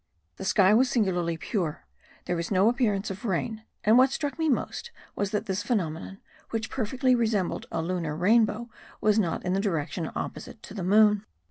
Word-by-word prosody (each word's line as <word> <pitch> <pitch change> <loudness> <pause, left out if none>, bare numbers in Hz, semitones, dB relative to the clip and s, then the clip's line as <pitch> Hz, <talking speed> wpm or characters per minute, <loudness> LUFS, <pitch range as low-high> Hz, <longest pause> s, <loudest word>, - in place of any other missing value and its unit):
The - - -6
sky 195 -1 +4
was 250 +4 +4
singularly 180 -9 0
pure; 165 -3 -3 0.4
there 180 - -1
was 170 0 -3
no 195 +2 +4
appearance 215 -5 0
of 195 +2 -8
rain; 220 +2 -2 0.2
and 220 +4 +6
what 260 +1 +6
struck 285 +2 -3
me 320 -1 +2
most 290 - -2 0.3
was 200 - -1
that 210 0 -2
this 190 +1 -2
phenomenon, 190 -5 -2 0.3
which 225 -1 -3
perfectly 255 +2 +1
resembled 220 -6 0
a 165 - -1
lunar 165 -3 -2
rainbow, 215 +5 +2 0.3
was 215 0 +3
not 175 -4 -1
in 180 - 0
the 195 - +1
direction 170 -4 -2
opposite - - -6
to - - -10
the 200 -4 -4
moon. 210 +2 +4
205 Hz, 180 wpm, -27 LUFS, 180-230 Hz, 0.4 s, and